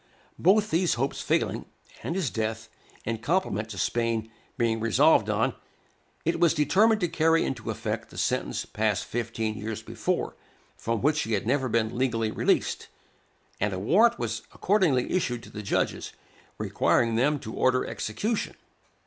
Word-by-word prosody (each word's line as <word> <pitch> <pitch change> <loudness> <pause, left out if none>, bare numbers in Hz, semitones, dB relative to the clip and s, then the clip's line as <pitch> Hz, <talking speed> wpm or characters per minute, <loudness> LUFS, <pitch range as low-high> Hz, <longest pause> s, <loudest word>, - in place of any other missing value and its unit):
Both 205 +4 +4
these 170 +2 +2
hopes 135 +3 -2
failing, - - 0 0.4
and 165 - -3
his 185 -8 -1
death, 110 0 -3 0.4
in 115 0 -2
compliment 115 - 0
to 105 - -7
Spain, 115 +2 -1 0.3
being 115 -1 +1
resolved 110 -3 +4
on, - - +1 0.7
it 165 - +1
was 170 -2 +4
determined 210 +8 +4
to 175 - +2
carry 165 0 +2
into 120 -5 -4
effect - - -3
the - - -13
sentence - - -1
passed 105 -2 -1
fifteen 115 -2 -2
years 110 0 -5
before, - - -2 0.4
from 115 0 -2
which 150 +2 +3
he 115 - -2
had 105 - 0
never 130 +2 +1
been 110 -1 0
legally 115 -3 0
released; - - 0 0.7
and 105 -1 0
a 95 - -3
warrant 210 - +4
was 115 -1 -3
accordingly 180 -11 +2
issued 125 -10 -1
to - - -12
the 105 - -6
judges, 100 - -1 0.4
requiring 115 -1 +2
them 135 +6 +2
to 110 -5 -8
order 130 0 +2
execution. 210 - -2
120 Hz, 155 wpm, -27 LUFS, 110-165 Hz, 0.7 s, Both